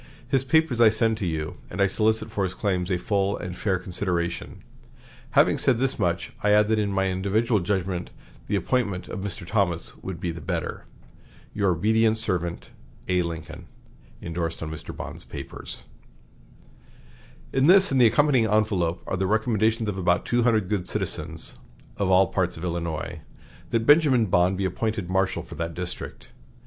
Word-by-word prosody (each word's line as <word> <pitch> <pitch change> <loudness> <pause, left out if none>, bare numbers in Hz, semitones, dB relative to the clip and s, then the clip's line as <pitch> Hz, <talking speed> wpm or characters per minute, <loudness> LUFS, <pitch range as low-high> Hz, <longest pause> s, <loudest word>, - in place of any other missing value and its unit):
His 135 0 +1
papers 140 -4 +2
I 115 - +8
send 110 0 +1
to 100 - -1
you; 80 +2 -3
and - - -7
I 100 - +5
solicit 110 +2 0
for 100 - -1
his 90 -1 -2
claims 95 -3 -1
a 90 - +1
full 100 +1 0
and 90 -1 -6
fair 95 -1 0
consideration. 90 -1 -3 0.7
Having - - +5
said 125 - +3
this 135 +2 0
much, 85 0 -1
I 105 - +2
add 105 +1 +5
that 110 -1 +2
in 105 -1 0
my 95 0 +1
individual 105 +4 +1
judgment 90 -1 -2 0.4
the - - 0
appointment 100 -8 -1
of 95 - -5
Mr. 95 -3 -4
Thomas 90 -4 -1
would 95 -3 -7
be 90 -1 -2
the 85 - -8
better. - - -4 0.7
"Your 100 -2 +1
obedient 110 +5 +2
servant, 90 -6 -1 0.4
"A. 90 -1 +2
LINCOLN" 85 -1 -6 0.5
(Indorsed 85 -1 -3
on 80 - -5
Mr. 80 0 -8
Bond's - - -7
papers.) - - -8 1.7
"In 135 +2 +3
this 190 0 +6
and 135 -1 +3
the 120 - +8
accompanying 130 0 +3
envelop 100 -6 +1
are 95 - -2
the 95 +1 0
recommendations 110 +1 +1
of 100 -2 -2
about 90 -1 +2
two 120 0 +1
hundred 110 -5 +2
good 95 -3 -2
citizens, - - -3 0.4
of 100 -2 0
all 95 +1 +6
parts 90 -3 0
of 80 - -8
Illinois, 85 -1 -3 0.5
that 115 -1 0
Benjamin 145 -6 +5
Bond 90 0 +2
be 95 - -1
appointed 105 0 -2
marshal 95 0 +1
for - - -11
that 85 0 -4
district. 90 +1 -6
95 Hz, 170 wpm, -25 LUFS, 90-110 Hz, 1.7 s, I